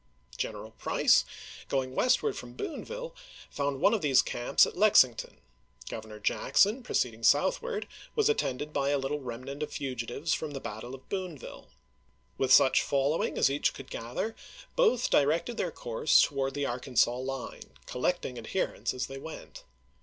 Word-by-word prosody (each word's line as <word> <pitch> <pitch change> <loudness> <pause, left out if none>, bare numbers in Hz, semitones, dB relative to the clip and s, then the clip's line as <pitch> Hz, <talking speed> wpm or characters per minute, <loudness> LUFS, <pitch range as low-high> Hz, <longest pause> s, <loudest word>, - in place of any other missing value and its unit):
General - - -5
Price, - - +3 0.4
going 130 -2 -1
westward 250 - +2
from 120 0 -8
Boonville, - - -6 0.4
found 140 -1 -2
one 205 - +5
of 220 - +1
these 140 -4 +4
camps 120 - +3
at - - -7
Lexington; 175 - +4 0.5
Governor 110 -1 -8
Jackson, 205 - +2
proceeding 120 - -1
southward, 425 - +2 0.3
was 440 -2 +3
attended 150 - -1
by 140 -1 0
a 145 - +2
little 140 +2 -2
remnant 130 +2 -7
of 150 - -3
fugitives 130 +3 -3
from 155 -2 -3
the 135 - -4
battle 120 +2 -7
of 130 - -17
Boon 185 -5 -4
ville. - - -11 0.7
With 130 -1 0
such 135 -1 +6
following 140 +3 0
as 135 - +4
each 145 - 0
could 135 - -11
gather 125 - -4 0.4
both 345 - +3
directed 160 +11 +2
their 180 - 0
course 120 0 +3
toward 135 -1 -1
the 145 -1 -1
Arkansas 125 -1 +1
line, 130 0 -6
collecting 125 -2 -2
adherents 125 +7 -2
as 125 - -2
they 135 0 -8
went. 160 +3 -10
140 Hz, 155 wpm, -29 LUFS, 125-175 Hz, 0.7 s, such